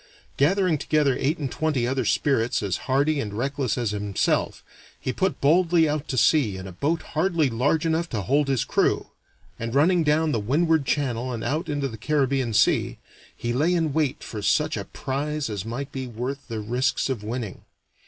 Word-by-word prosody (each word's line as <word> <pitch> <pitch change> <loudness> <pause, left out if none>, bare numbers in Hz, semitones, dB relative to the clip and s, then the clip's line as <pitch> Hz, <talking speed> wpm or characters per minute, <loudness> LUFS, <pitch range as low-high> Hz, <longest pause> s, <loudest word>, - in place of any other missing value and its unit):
Gathering 180 +1 +2
together 145 -2 +2
eight 150 +5 +1
and 140 -4 -4
twenty 150 -6 0
other 130 -1 -1
spirits 120 -1 +1
as 95 -2 -1
hardy 140 +3 +2
and 105 -6 -3
reckless 135 0 -1
as 120 -4 -1
himself, 105 -1 -1 0.4
he 130 - -3
put 190 0 -1
boldly 165 +2 +4
out 150 0 -2
to 130 - -3
sea 120 -7 +3
in 95 - -7
a 95 - -7
boat 150 - -1
hardly 160 -4 +1
large 145 +8 +1
enough 165 +1 0
to 110 - -2
hold 140 +6 +2
his 135 -3 +1
crew, - - +1 0.5
and 115 +2 -4
running 170 +4 +4
down 155 +1 +2
the 115 - 0
Windward 150 +6 +1
Channel 130 -3 -1
and 115 -2 -4
out 155 +6 -2
into 145 -2 -1
the 115 -4 -8
Caribbean 135 -2 +1
Sea, 105 - +2 0.4
he 120 0 -2
lay 160 +8 +2
in 160 -4 0
wait 150 -4 0
for 105 - -6
such 150 +9 +1
a - - -4
prize 145 -1 -3
as 100 -1 -4
might 135 +5 -5
be 130 -2 -5
worth 125 +4 -5
the 115 -3 -4
risks 125 +4 0
of 130 -6 -3
winning. 110 -2 -5
140 Hz, 190 wpm, -24 LUFS, 120-155 Hz, 0.5 s, boldly